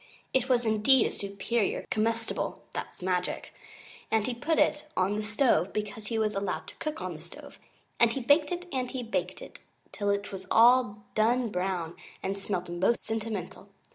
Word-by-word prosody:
It 260 0 +2
was 245 -2 +3
indeed 220 +4 +5
a - - -1
Superior 200 +2 -1
Comestible 225 +1 -1
(that's - - -6
magic), 180 -1 -2 0.6
and 220 -1 +2
he 250 - -1
put 295 +7 0
it 295 +1 +2
on 200 +3 +1
stove 215 -2 +2
because 210 0 -4
he 225 - -1
was 215 -1 +1
allowed 195 -1 -2
to - - -13
cook 305 -10 -4
on 185 -1 -3
the 155 - -10
stove, 170 - -12 0.4
and 235 -1 +6
he 270 - -2
baked 290 +5 +3
it 355 0 -3
and 255 -2 -1
he 260 -2 -4
baked 230 - -3
it - - -12 0.3
till 205 -1 -2
it 200 0 -1
was 190 -1 -7
all 230 -3 +5
done 235 +2 +2
brown 180 -3 -2 0.3
and 195 +1 -2
smelt 190 -2 -2
most 175 +7 +1
sentimental. 210 -3 -4
215 Hz, 175 wpm, -29 LUFS, 195-245 Hz, 0.6 s, and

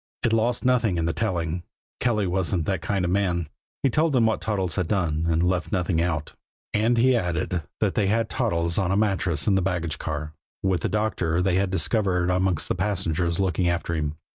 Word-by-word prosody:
It 115 - +2
lost 115 +2 +1
nothing 120 -7 +2
in 80 - 0
the 85 - 0
telling 85 -5 -1 0.4
Kelly 110 -5 +1
wasn't 90 -2 0
that 95 -2 -1
kind 95 +1 -1
of 85 - 0
man 90 -4 0 0.4
he 135 - +3
told 155 +2 +2
them 120 -3 +4
what 110 -1 +1
Toddles 95 -6 -1
had 90 - 0
done, 85 -5 0
and 80 +1 +2
he - - +3
left 90 -1 -1
nothing 90 -4 +1
out; 80 -3 -2 0.4
and 115 +3 +2
he 130 +2 +4
added 90 -3 -1 0.2
that - - +2
they 100 - +1
had 115 +2 +1
Toddles 85 -10 0
on 95 -3 0
a 95 - +2
mattress 95 -7 +1
in 105 - +3
the 95 - +3
baggage 85 -4 -2
car, 80 0 -4 0.3
with 95 -3 +1
a - - 0
doctor 100 -6 0
they 90 0 +1
had 95 0 +1
discovered 90 +1 +1
amongst 90 -3 +1
the - - 0
passengers 90 -3 -1
looking 90 -2 +1
after 85 -1 -1
him. 75 -2 -2
90 Hz, 210 wpm, -25 LUFS, 85-105 Hz, 0.4 s, them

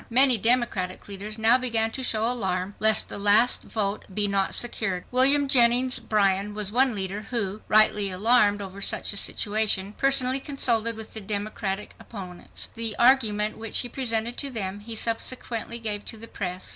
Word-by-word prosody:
Many 255 0 +5
Democratic 225 -6 0
leaders 205 +2 -7
now 225 +3 +4
began 225 -3 +1
to 265 - -5
show 220 -3 0
alarm 190 -5 -1
lest 220 0 +3
the - - -7
last 210 +4 +4
vote 205 -2 -3
be 205 +2 +1
not 195 -1 0
secured. 205 -6 0
William 275 +3 +4
Jennings 250 0 +3
Bryan 200 -1 0
was 210 -2 -2
one 255 0 +2
leader 195 +2 -5
who, 210 -4 -3
rightly 210 -1 +3
alarmed 205 +1 +2
over 195 +1 -10
such 200 - -1
a - - -4
situation, 205 -1 0
personally 270 0 +1
consulted 235 -5 0
with 220 0 -9
the 220 - -5
Democratic 205 0 -4
opponents. 185 -5 -10
The 225 -2 -1
argument 220 -5 +2
which 225 -1 -2
he 245 - -5
presented 235 -2 -2
to 280 - -2
them 205 -5 -5
he 225 +2 -7
subsequently 230 0 -2
gave 210 -3 -3
to 225 - -6
the 230 +1 -9
press. 185 -4 -5
220 Hz, 170 wpm, -25 LUFS, 200-240 Hz, -, Many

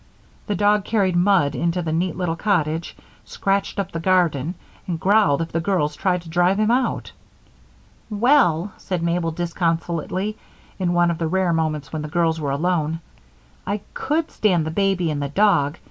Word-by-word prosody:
The 205 - 0
dog 205 0 +3
carried 195 -5 +1
mud 175 -5 +3
into 170 +1 -1
the 160 - -2
neat 170 +1 0
little 175 -2 -1
cottage, 165 -4 -1 0.3
scratched 195 0 -1
up 200 -4 -2
the 165 - -4
garden, 170 -3 +1 0.3
and 170 -3 -2
growled 195 -6 +3
if 165 - -8
the 165 - 0
girls 165 -5 0
tried 180 -1 0
to 165 - -11
drive 175 +3 +2
him 215 +1 +2
out. 255 +2 0 1.0
"Well," 210 - +3
said 180 -3 -3
Mabel, 170 0 0
disconsolately, 170 +4 -2 0.4
in 175 -2 0
one 175 0 +3
of 165 - -4
the 165 - 0
rare 185 0 +1
moments 155 -2 -2
when 155 - -2
the 150 - -5
girls 165 0 0
were 145 - -2
alone, 160 +2 0 0.7
"I 200 +1 -2
could 310 +3 -1
stand 180 -7 +1
the 160 - -3
baby 185 -2 +1
and 145 -1 -3
the 140 - -2
dog. 155 -4 +2
175 Hz, 175 wpm, -22 LUFS, 160-195 Hz, 1.0 s, dog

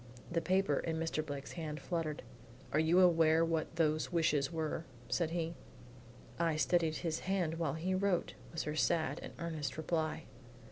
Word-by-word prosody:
'" - - -17
The 165 0 +1
paper 185 -6 +2
in 165 -1 -2
Mr. 165 -1 -1
Blake's 140 -2 -6
hand 155 -3 -4
fluttered. 160 -1 -3 0.5
"You 160 +3 +4
are - - +8
aware 165 -2 +5
what 165 0 -1
those 155 0 +1
wishes 160 -5 +2
are?" 160 -1 -2 0.3
said 170 -3 +1
he. 165 0 -2 0.9
"I 165 -2 +2
steadied 160 0 +2
his 160 -1 0
hand 175 -4 -1
while 155 -4 0
he 175 +4 -1
wrote," 185 -2 +1 0.2
was 165 - -2
her 150 - -3
sad 155 +1 +1
and - - -7
earnest 160 -4 -3
reply. 160 0 -1
160 Hz, 170 wpm, -35 LUFS, 155-170 Hz, 0.9 s, are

